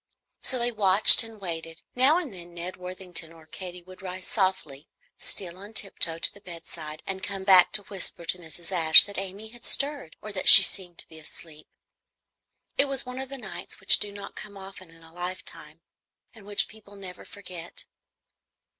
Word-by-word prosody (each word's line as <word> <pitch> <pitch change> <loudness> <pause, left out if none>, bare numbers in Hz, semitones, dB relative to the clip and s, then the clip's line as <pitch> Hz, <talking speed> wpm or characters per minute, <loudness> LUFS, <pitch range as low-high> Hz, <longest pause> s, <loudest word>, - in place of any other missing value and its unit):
So 260 - +1
they 240 0 0
watched 205 -2 +7
and 225 -1 -9
waited. 165 -3 -8
Now 265 +6 +3
and 320 - -5
then 175 -1 -12
Ned 175 +2 -7
Worthington 180 -2 -4
or 165 -1 -17
Katy 180 +2 -9
would 185 +1 -15
rise 185 0 -8
softly, 185 -8 -2 0.3
steal 180 -1 -5
on 205 +3 -11
tiptoe 195 -5 -1
to - - +3
the 200 - -17
bedside, 165 -4 -10
and 190 0 -6
come 195 -1 -5
back 185 -2 +5
to 210 - +3
whisper 190 -3 -4
to 180 - -3
Mrs. 170 +1 -7
Ashe 160 -3 +7
that 200 -1 -7
Amy 195 +3 -8
had 240 +1 -15
stirred 280 - -1
or 215 - -9
that 185 -2 +2
she 195 - +12
seemed 180 -3 -3
to - - -8
be 160 - -15
asleep. 155 0 -14 1.1
It 280 - +6
was 275 -2 -3
one 250 +1 -7
of 265 -1 -5
the 275 - -8
nights 190 -9 -8
which 195 - +4
do 205 - -2
not 200 0 -10
come 205 -1 -11
often 190 -2 -13
in 165 0 -19
a 165 0 -18
lifetime, 180 +1 -8 0.5
and 215 -4 -17
which 205 -1 +1
people 205 -2 -16
never 185 -2 -11
forget. 180 -4 -11
185 Hz, 190 wpm, -25 LUFS, 170-205 Hz, 1.1 s, she